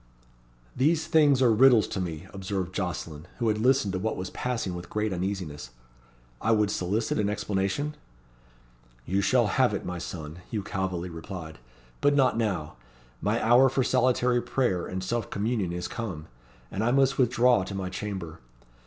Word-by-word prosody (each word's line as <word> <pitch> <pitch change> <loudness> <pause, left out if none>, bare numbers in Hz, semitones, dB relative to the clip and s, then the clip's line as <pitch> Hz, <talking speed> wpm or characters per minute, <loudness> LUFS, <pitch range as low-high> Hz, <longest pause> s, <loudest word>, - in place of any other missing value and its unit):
'" - - -33 0.3
"These 155 +4 +2
things 150 -5 +4
are 120 -3 +5
riddles 120 -1 +6
to 95 - -3
me," 85 -1 -5
observed 95 -2 -3
Jocelyn, 85 -4 -4
who 115 -3 +1
had 105 0 0
listened 125 -4 +2
to 95 - -1
what 110 +3 -2
was 90 0 -5
passing 115 -7 -2
with 85 0 -7
great 105 -1 -1
uneasiness. 90 -7 -4 0.7
"I 115 - +3
would 105 -2 +2
solicit 100 +6 -1
an 105 -1 +1
explanation?" 105 +8 -1 1.1
"You 95 +3 +1
shall 120 +3 +3
have 120 +1 +2
it, - - -5
my 90 -1 -4
son," 80 -1 -7
Hugh 105 -3 -3
Calveley 95 -2 -3
replied. 80 -1 -8 0.4
"But 145 0 +4
not 135 -2 +4
now. 100 - -2 0.4
My - - +1
hour 125 +3 +6
for 130 +1 +1
solitary 125 -1 +2
prayer 120 -11 0
and 95 0 -4
self 115 +3 -2
communion 105 -3 -1
is 90 0 -3
come, 90 -10 -5 0.5
and 100 - -2
I 115 - +2
must 135 +1 +3
withdraw 125 -3 +4
to 95 +1 -6
my 95 -1 -3
chamber. 95 -5 -5
105 Hz, 170 wpm, -27 LUFS, 90-125 Hz, 1.1 s, riddles